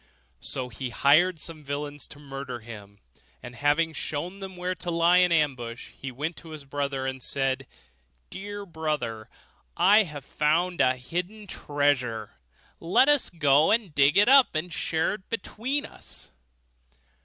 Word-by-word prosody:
So 125 - -2
he 125 +2 -5
hired 155 +8 +4
some 155 0 -7
villains 145 0 -5
to - - -11
murder 135 -4 -7
him; 105 -3 -11 0.5
and 120 - -8
having 150 +5 +2
shown 170 +6 -4
them 190 -2 -8
where 180 +1 -2
to 180 -1 -6
lie 170 +1 +4
in 180 -1 +4
ambush, 130 -7 -1
he 135 - -6
went 150 +7 -4
to 165 - -12
his 155 -3 -9
brother, 140 -1 -2
and 130 0 -4
said, 135 0 -1 0.6
'Dear 205 +1 -6
brother, 150 - -3 0.5
I 200 +5 +6
have 150 -8 -6
found 170 +4 +1
a 130 0 +4
hidden 180 +11 -5
treasure; 145 - -1 0.5
let 185 +11 +4
us 290 -2 +3
go 150 -2 +4
and 215 -7 +1
dig 145 +5 +4
it 205 +3 +6
up, 270 - +6
and 160 +2 -2
share 160 +1 0
it 205 -2 -10
between 255 +5 -3
us. - - -10
150 Hz, 155 wpm, -27 LUFS, 135-180 Hz, 0.6 s, I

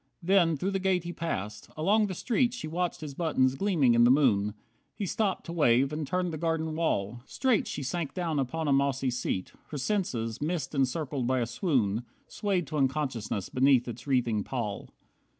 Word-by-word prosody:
Then 170 -3 +4
through 190 +8 -1
the 195 - 0
gate 185 -2 +1
he 175 0 -5
passed. 105 - -4
Along 205 +7 +3
the 190 - -4
street 240 +4 +1
She 240 - -5
watched 175 +2 -2
his 150 -3 -6
buttons 135 -5 +2
gleaming 150 -6 +2
in 120 0 +5
the 120 - +6
moon. 110 -7 +3 0.4
He 205 - -3
stopped 195 +1 -1
to 170 - -6
wave 135 -3 +3
and 150 -1 -3
turned 180 0 -1
the 155 - -4
garden 160 -1 -1
wall. 120 -8 -1
Straight 255 -5 +1
she 145 - -4
sank 160 +3 -3
down 165 -5 -1
upon 150 +4 -2
a 140 - +3
mossy 135 -1 +1
seat. 120 -6 -3
Her 150 - -6
senses, 130 - -1
mist 155 -2 -2
encircled 135 -1 -1
by 130 0 +2
a 120 - +1
swoon, 120 - 0 0.3
Swayed 195 -4 -1
to 150 +2 -4
unconsciousness 130 -8 -1
beneath 130 -1 +3
its 120 - -7
wreathing 120 -6 +1
pall. 105 -5 -4
145 Hz, 185 wpm, -29 LUFS, 125-175 Hz, 0.4 s, the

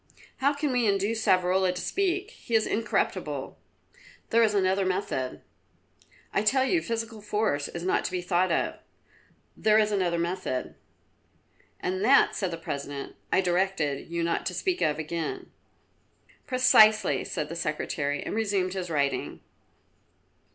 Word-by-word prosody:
"How 280 +1 +2
can 290 -1 -1
we 245 -3 +2
induce 205 +3 0
Savrola 185 0 +2
to - - -4
speak? 390 - -1
He 235 - -4
is 220 - +4
incorruptible." 220 0 -2 0.7
"There 230 - +5
is 215 -2 +3
another 190 0 +2
method." 185 -9 -2 0.9
"I - - +2
tell 260 +5 +3
you 335 +4 +2
physical 225 -3 -4
force 210 -9 -1
is 170 - -7
not 185 - +1
to - - -2
be 180 -1 -3
thought 180 +1 +1
of." - - -1 0.8
"There 215 0 +3
is 215 -1 +3
another 180 -4 +1
method." 170 -6 -2 1.1
"And 185 +2 -2
that," 270 +5 +5
said 190 -4 -1
the 165 - -5
President, 140 -3 -6 0.2
"I - - +4
directed 175 -6 0
you 170 0 -2
not 170 0 -1
to - - -3
speak 370 -2 -1
of 150 - +2
again." 160 +1 -4 1.0
"Precisely," 215 - +5
said 150 - -4
the 165 - -7
Secretary, 150 -3 -2
and - - -5
resumed 200 -4 0
his 185 -2 -4
writing. 140 -3 -1
190 Hz, 145 wpm, -27 LUFS, 170-220 Hz, 1.1 s, There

